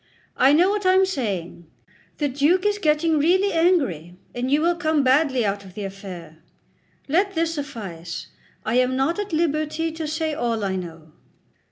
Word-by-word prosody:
I 260 +2 +5
know 350 +6 +4
what 415 0 -2
I 370 0 +4
am 380 0 +5
saying. 195 - -4 0.5
The 295 - 0
Duke 295 +8 +2
is 415 0 +1
getting 310 -2 +2
really 375 +6 +2
angry, 275 - +1 0.2
and 245 +1 -2
you 290 +2 +3
will 340 +3 +2
come 315 -4 +1
badly 260 -2 +3
out 200 0 -2
of 190 -1 -14
the 210 - -5
affair. 185 -5 -9 0.7
Let 375 +7 +1
this 330 0 0
suffice; 205 - -6 0.4
I 225 +3 +1
am 255 +1 +1
not 275 +9 0
at 415 -2 -4
liberty 315 0 0
to 320 -1 -5
say 315 0 -2
all 235 -7 -1
I 190 -1 -1
know." 165 -4 -8
290 Hz, 175 wpm, -23 LUFS, 205-330 Hz, 0.7 s, I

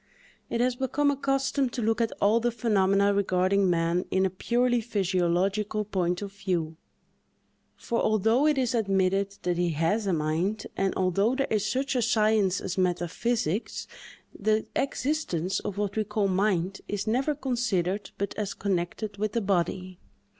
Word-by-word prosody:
It 235 - 0
has 250 0 +2
become 285 +2 +1
a - - -1
custom 275 0 0
to 240 - -4
look 225 +2 +1
at 230 - +1
all 210 +3 +4
the 240 +1 +1
phenomena 200 -3 +2
regarding 190 0 +2
man 170 +1 +1
in 190 0 +2
a 190 - 0
purely 240 +5 +1
physiological 195 0 0
point 180 -2 -1
of 200 - -6
view; 180 -5 -2 1.0
for 235 - -2
although 225 +7 +3
it 300 -2 +2
is 255 -3 +1
admitted 195 -2 +1
that 180 -1 0
he 175 -1 +2
has 170 +8 0
a - - +2
mind, 165 +7 -1
and 195 -1 0
although 195 +6 +1
there 275 0 +1
is 210 -1 +1
such 265 +5 -1
a 250 - +2
science 215 -4 +2
as 185 +1 -4
metaphysics, 180 +3 -1 0.5
the 215 +1 0
existence 265 - -1
of 200 - -5
what 205 -1 -2
we 220 - +1
call 210 -1 0
mind 190 -1 0
is 205 -1 -3
never 260 +7 +1
considered 225 -8 -1
but 200 0 -2
as 205 -2 -3
connected 200 +2 -2
with 215 +1 -2
the 235 - +1
body. 185 -1 -1
200 Hz, 160 wpm, -27 LUFS, 185-230 Hz, 1.0 s, all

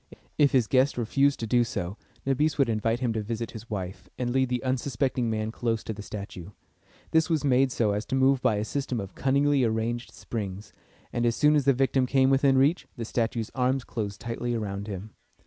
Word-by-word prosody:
If 145 -2 +5
his 125 -4 +3
guest 130 +3 +2
refused 135 +4 +2
to - - -1
do 120 +2 +3
so, 95 -5 -4 0.3
Nabis 145 +3 +1
would 135 -4 +3
invite 115 +2 0
him 120 -3 +1
to 110 - -1
visit 115 +2 -4
his 115 +2 -10
wife, 95 -3 -5
and 120 -1 -1
lead 130 0 +2
the 125 0 -1
unsuspecting 130 -1 0
man 110 0 -1
close 115 -1 -1
to 110 - -4
the 105 - -8
statue. 100 -4 -7 0.6
This 160 +1 +3
was 160 -3 +1
made 135 -1 +3
so 110 -4 +1
as 105 +1 -1
to - - -1
move 135 0 +3
by 125 -4 +3
a 105 +1 -1
system 135 -1 -2
of 100 -1 -6
cunningly 140 0 +2
arranged 115 +1 -1
springs, 100 -3 -6 0.4
and 120 - 0
as 120 -1 +2
soon 150 0 +4
as 145 -3 +2
the 140 - +5
victim 130 0 +2
came 135 0 +3
within 135 0 +4
reach, 140 +2 +2
the 115 - -4
statue's 115 -1 -1
arms 130 0 +1
closed 100 -5 -4
tightly 120 +1 -3
around 100 -2 -4
him. 100 +1 -6
120 Hz, 210 wpm, -27 LUFS, 110-135 Hz, 0.6 s, If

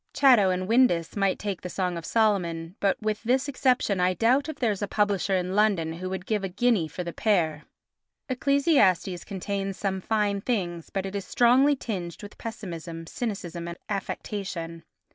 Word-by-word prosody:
Chatto 250 -9 +5
and 185 0 -1
Windus 220 -8 +3
might 195 -2 +1
take 200 -3 -4
the 180 - -6
Song 180 -1 -1
of 165 -1 -6
Solomon, 180 -6 +1
but, 195 -1 +1
with 215 0 -1
this 255 +4 +1
exception, 255 -7 +1
I 180 0 +2
doubt 260 - +2
if 315 - -4
there 235 -5 +1
is 200 - -4
a 205 - -1
publisher 200 -1 +1
in 180 0 -1
London 195 -7 +2
who 185 +3 -5
would 190 0 -5
give 210 -2 -1
a 195 - -2
guinea 205 -3 +2
for 180 - -5
the 170 -1 -5
pair. 165 -8 +1 0.6
Ecclesiastes 255 - +2
contains 195 0 -4
some 190 -2 -2
fine 205 -1 0
things 175 -8 -2
but 195 -1 -3
is 195 0 -4
strongly 255 +7 +4
tinged 185 - -5
with 205 - -11
pessimism, 170 -7 -6
cynicism 175 -4 -4
and 170 0 -6
affectation. 185 -4 -4
195 Hz, 175 wpm, -26 LUFS, 180-220 Hz, 0.6 s, Chatto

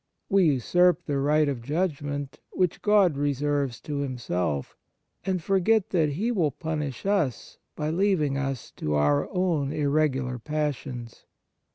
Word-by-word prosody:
We 195 -2 +4
usurp 175 +6 +3
the 140 -2 -1
right 150 +2 +3
of 135 -4 -2
judgment, 145 -1 -2
which 180 -3 0
God 205 -6 +4
reserves 145 -2 0
to 150 -1 -4
Himself, 90 - -2 0.5
and 185 -3 0
forget 195 +3 +2
that 155 -5 +2
He 215 +11 -1
will 175 -10 +2
punish 150 -2 -4
us 195 - -1 0.2
by 150 0 -2
leaving 170 -6 +1
us 135 -2 -3
to 75 0 -1
our 75 -1 +2
own 170 -7 0
irregular 140 -4 0
passions. 140 -4 -4
145 Hz, 135 wpm, -26 LUFS, 135-175 Hz, 0.5 s, We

